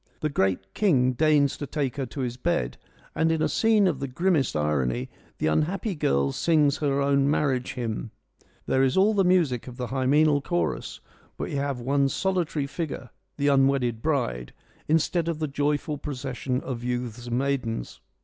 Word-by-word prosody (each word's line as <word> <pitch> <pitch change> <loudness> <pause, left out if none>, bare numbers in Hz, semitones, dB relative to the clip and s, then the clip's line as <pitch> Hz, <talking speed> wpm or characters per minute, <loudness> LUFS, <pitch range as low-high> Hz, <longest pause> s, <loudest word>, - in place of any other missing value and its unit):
The 155 - 0
great 95 -6 -1
king 135 -12 +3
deigns 145 0 +3
to 145 - -5
take 140 -3 -2
her 135 -2 -2
to 120 +5 -6
his 125 -2 -2
bed, 60 - -1 0.3
and 160 0 +2
in 160 - +1
a - - +3
scene 220 -2 +3
of 165 -8 +1
the 140 - -3
grimmest 150 - +1
irony 65 -5 0 0.3
the - - -2
unhappy 175 - 0
girl 70 - +1
sings 150 - +2
her 140 -2 0
own 140 0 +2
marriage 135 -4 0
hymn. 115 -2 -3 0.6
There 130 - +2
is 135 +3 +2
all 205 +3 +5
the 200 -2 +3
music 170 -11 +2
of 125 -1 -9
the 125 - -3
hymeneal 145 +3 +3
chorus, 85 - -2 0.4
but - - -4
we - - -4
have 140 -2 -2
one 135 +3 +1
solitary 175 -5 -1
figure 140 -3 -5
— - - -49
the 145 0 +2
unwedded 135 -4 +2
bride 120 - -1 0.2
— - - -32
instead 160 +2 +1
of 165 -2 -1
the 155 0 -2
joyful 145 +1 -1
procession 130 -2 -3
of 120 -3 -5
youths 120 -1 -3
and 120 0 -1
maidens. 130 - -2
140 Hz, 180 wpm, -26 LUFS, 125-155 Hz, 0.6 s, all